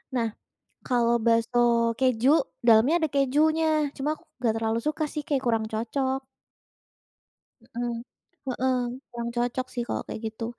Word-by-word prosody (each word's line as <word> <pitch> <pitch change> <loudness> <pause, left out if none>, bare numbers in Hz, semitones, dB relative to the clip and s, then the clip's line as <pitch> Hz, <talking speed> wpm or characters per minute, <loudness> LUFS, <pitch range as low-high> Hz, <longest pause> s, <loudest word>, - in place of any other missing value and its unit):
Nah 230 -3 0 0.5
kalau 235 -2 +2
bakso 235 0 +2
keju 255 -1 +2 0.3
dalamnya 235 +6 +5
ada - - +1
kejunya 305 +2 +2
cuma 280 +1 -2
aku - - -21 0.2
gak 225 -1 +3
terlalu 225 0 0
suka 305 +1 0
sih 300 0 -5
kayak 275 -3 0
kurang 225 -2 +1
cocok. 260 +4 -1 1.5
Mmm, 240 0 -2 0.6
heeh, 255 +1 +1 0.3
kurang 235 0 -4
cocok 245 +1 -1
sih 240 - -1
kalau - - -2
kayak - - -5
gitu. 220 +1 -5
240 Hz, 135 wpm, -26 LUFS, 230-275 Hz, 1.5 s, dalamnya